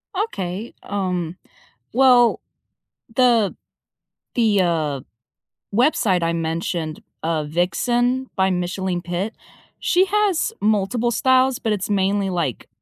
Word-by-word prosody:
Okay. 210 - -3
Um, 180 -4 -2 0.6
well, 245 -2 +5 0.8
the 235 -6 +3 0.8
the, 215 -5 +3
uh, 155 -6 0 0.7
website 215 - +2
I 165 0 +1
mentioned, 165 -1 -3 0.2
uh, 160 -2 0
Vixen 240 - 0
by 190 0 +2
Micheline 180 0 -2
Pitt, 175 +5 -3 0.5
she 370 0 +3
has 410 -1 +1
multiple 220 +3 +1
styles, 260 +1 +3
but 220 - -1
it's 200 -1 -2
mainly, 200 0 +1
like, 165 - -2
195 Hz, 105 wpm, -21 LUFS, 175-245 Hz, 0.8 s, well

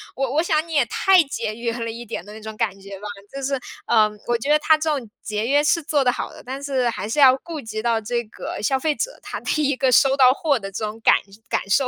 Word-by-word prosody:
我 270 -2 -1
我 315 - +3
想 315 -2 +1
你 330 - -7
也 280 -5 +3
太 370 +8 +4
节 230 -6 -4
约 235 0 -3
了 230 0 -3
一 235 +1 -7
点 215 -6 -5
的 210 - -11
那 220 - -10
种 220 0 -7
感 195 - -1
觉 195 0 -10
吧。 210 - -7 0.3
就 275 - -5
是， 275 0 -1 0.3
呃， 215 -2 +4 0.2
我 240 -1 +2
觉 275 +6 -2
得 300 - +5
它 310 +1 +4
这 310 +1 -1
种 235 -5 -8
节 215 +1 -2
约 290 +2 +3
是 300 +3 +2
做 290 -2 +1
得 250 - +3
好 - - -5
的， - - -13
但 265 +2 -6
是 265 -3 0
还 205 -3 -4
是 295 - -1
要 265 -2 +8
顾 325 +1 -7
及 215 -1 -5
到 230 -1 +1
这 235 +2 -2
个 215 - -7
消 265 +5 +1
费 300 +3 0
者 - - -4
他 - - -5
的 305 - -1
一 285 - +1
个 260 0 +1
收 270 +2 +5
到 255 -2 +7
货 285 -4 0
的 195 -1 -7
这 215 +3 -3
种 215 +2 -6
感 - - +6 0.3
感 - - -1
受。 255 +6 +3
255 Hz, 300 characters per minute, -22 LUFS, 220-285 Hz, 0.3 s, 要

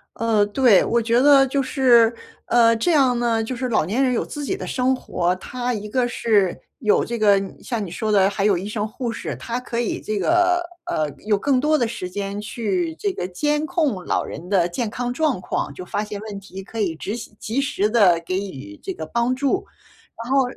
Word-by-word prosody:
呃， 220 -2 +2
对， 220 -3 +5
我 235 0 +1
觉 230 +1 +2
得 275 -1 +7
就 275 +1 0
是， 240 -4 +4 0.3
呃， 230 -1 +4
这 230 +11 +1
样 265 -6 +4
呢， 230 -2 +1
就 250 +3 -4
是 255 +1 -3
老 215 -9 +2
年 225 +10 0
人 260 - +2
有 235 - 0
自 295 - -6
己 - - -2
的 - - -6
生 260 +1 +1
活。 180 -7 -1
他 245 +6 -4
一 210 -2 -5
个 245 +3 0
是 210 -6 +1 0.2
有 215 -6 +2
这 235 - -3
个 205 -3 +4
你 195 -1 -8
像 235 -4 -2
你 - - -7
说 215 +4 -2
的 195 -2 +4
还 200 0 -1
有 205 -3 +3
医 190 +3 -5
生 210 0 -2
护 235 +2 -4
士， - - -5
他 235 +1 -4
可 235 -2 -4
以 240 - -2
这 215 - -3
个， 350 - +3 0.3
呃， 155 -1 0 0.2
有 210 -1 +2
更 265 +5 +1
多 305 +3 +2
的 240 - +1
时 185 -5 -5
间 200 +2 -4
去 320 - -2
这 400 +3 -2
个 180 - -4
监 295 +11 0
控 305 - -1
老 - - 0
人 170 +5 -8
的 185 -4 +3
健 210 +6 -3
康 245 +2 -3
状 295 -4 0
况， 180 - -3
就 185 - -8
发 205 +3 -2
现 210 -1 -6
问 210 -2 -7
题 195 -1 -10
可 225 +4 -8
以 175 -5 0
及时 215 +8 -6
及 235 +6 -1
时 275 -7 0
地 200 -7 +4
给 185 - -2
予 100 - -10
这 190 - -4
个 160 - -6
帮 235 +7 0
助。 280 +8 0 0.6
然 235 +3 -6
后 275 -1 +5
230 Hz, 245 characters per minute, -22 LUFS, 200-260 Hz, 0.6 s, 得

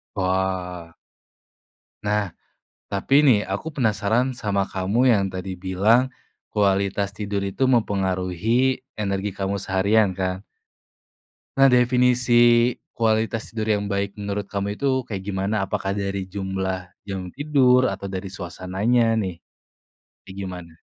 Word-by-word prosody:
Wah. 95 -2 -2 1.1
Nah. 105 -3 0 0.6
Tapi 135 +8 +3
nih 130 -8 +5
aku 95 - -4
penasaran 110 +1 +1
sama 105 -6 -1
kamu 105 +7 +2
yang 100 -2 +2
tadi 95 0 -6
bilang, 105 +7 +3 0.4
kualitas 100 -1 +1
tidur 100 -1 -3
itu 100 +7 0
mempengaruhi 105 +2 +1 0.2
energi 100 -1 -1
kamu 100 0 -2
seharian 95 +1 +2
kan? 95 0 -2 1.2
Nah, 135 0 +6
definisi 125 0 +3 0.6
kualitas 110 0 0
tidur 110 -1 -4
yang 100 - -4
baik 100 0 -2
menurut 100 0 -3
kamu 100 +1 -2
itu 130 -1 0
kayak 100 -5 -5
gimana? 100 +1 -1
Apakah 95 0 -2
dari 100 -1 -2
jumlah 95 -1 -3 0.2
jam 95 -2 -4
tidur 130 -3 +3
atau 100 0 -4
dari 95 0 -4
suasananya 100 +6 0
nih? 95 -6 -2 0.9
Kayak 95 - -12
gimana? 90 -3 -7
100 Hz, 120 wpm, -23 LUFS, 95-115 Hz, 1.2 s, Nah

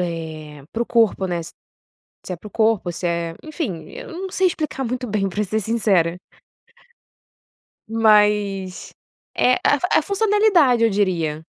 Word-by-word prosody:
eh, 155 -4 -6
para 235 - -1
o - - -6
corpo, 225 -4 +2
né, 175 -2 -2 0.6
se 185 - -11
é - - -4
para 190 - -14
o - - -9
corpo, 220 -6 +1
se 175 - -6
é 170 -1 -2
enfim, 250 - -5
eu - - -9
não 375 +3 -6
sei 375 0 +2
explicar 305 -5 -2
muito 250 +1 -3
bem 200 -2 0
pra 205 +3 -2
ser 215 +2 -1
sincera. 195 -6 +1 1.7
mas 210 -4 +2 0.4
é 250 - +4
a 290 +5 +3
funcionalidade 400 - +3
eu 230 - +5
diria, 170 -7 -1
210 Hz, 145 wpm, -21 LUFS, 175-250 Hz, 1.7 s, eu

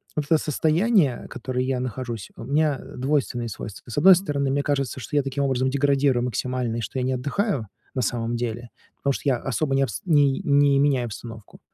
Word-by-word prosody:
вот 150 - -1
это 160 - +7
состояние, 155 - +1
которое 125 +1 -3
я 130 -1 -1
нахожусь, 125 -4 -5
у - - -8
меня 145 +1 +1 0.2
двойственные 130 -3 -1
свойства. 105 +3 -8
С - - -6
1 185 +5 +8
стороны, 145 -7 -1
мне 140 +1 +1
кажется, 140 -2 -1
что 150 - -6
я 145 - +3
таким 135 +1 -2
образом 130 -1 +1
деградирую 140 -2 +2
максимально, 125 -1 -2
и 115 - -2
что 130 - -4
я - - -1
не 130 - 0
отдыхаю 145 - -1 0.3
на 130 - 0
самом 115 0 -1
деле, 120 0 -4 0.3
потому 140 -1 0
что - - -5
я 135 -3 +3
особо 135 +3 -1
не 135 - +3
обс 135 - -3
не 145 -5 +3
не 140 -1 +4
меняю 140 -3 +2
обстановку. 110 -1 -9
135 Hz, 200 wpm, -24 LUFS, 120-145 Hz, 0.3 s, 1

